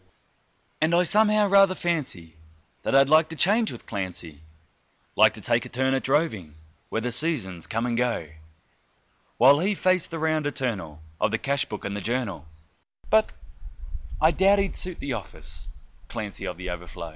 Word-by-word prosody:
And 160 +2 +3
I 175 - +4
somehow 210 +2 +3
rather 195 -1 +5
fancy 130 - -3 0.5
that - - -1
I'd 135 0 +5
like 155 +1 +5
to 160 - -7
change 215 +7 +3
with - - -10
Clancy, 90 -7 -6 0.7
Like - - +5
to - - -10
take - - 0
a - - -9
turn 130 +1 0
at 135 - 0
droving 120 - -1 0.3
where 110 - -2
the 125 +1 -2
seasons 115 - -1
come 115 +2 -2
and 120 -1 -1
go, 120 -9 -1 1.1
While 140 +4 +6
he 200 +5 0
faced 185 -2 +1
the 165 - -5
round 155 -1 0
eternal 110 - -4 0.2
of - - +2
the 115 - 0
cash 140 +3 -1
book 105 - -7
and 100 0 -3
the 105 - -4
journal 105 - -3 0.6
But - - +4 0.9
I 160 +1 +5
doubt 195 +3 +4
he'd 195 -1 -1
suit 180 -2 -5
the 140 -2 -3
office, 80 -7 -9 0.4
Clancy, 110 -4 -5
of 90 - -5
The 90 -1 -5
Overflow. 90 -1 -7
130 Hz, 170 wpm, -25 LUFS, -, 1.1 s, While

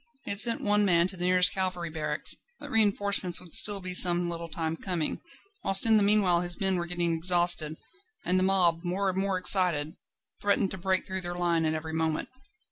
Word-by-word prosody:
He - - -6
had 200 - -3
sent 230 +1 +3
one 210 0 +2
man 170 -3 +2
to 190 - -6
the 175 0 -3
nearest 180 0 +4
cavalry 185 -3 -4
barracks, 155 -1 -2 0.2
but 290 - -11
reinforcements 200 -5 +1
would 175 -3 -13
still 205 -2 +3
be 180 -1 -5
some 175 -1 +4
little 170 0 -7
time 160 0 -4
coming; 170 -3 -4 0.4
whilst 195 +2 +4
in 220 -1 +4
the - - +2
meanwhile 200 -4 +2
his 175 +1 -3
men 190 -2 +2
were 175 0 -5
getting 175 -1 -1
exhausted, 170 -2 +2 0.5
and 185 +1 +1
the - - +1
mob, 180 -3 +1
more 190 +2 -2
and 185 - -5
more 195 -1 -2
excited, 180 -5 +3 0.5
threatened 200 -1 -1
to 190 - -6
break 190 +1 -2
through 190 0 -5
their 175 0 -7
line 170 -2 -1
at 155 - -2
every 160 0 -7
moment. 160 -1 -3
180 Hz, 210 wpm, -26 LUFS, 170-195 Hz, 0.5 s, nearest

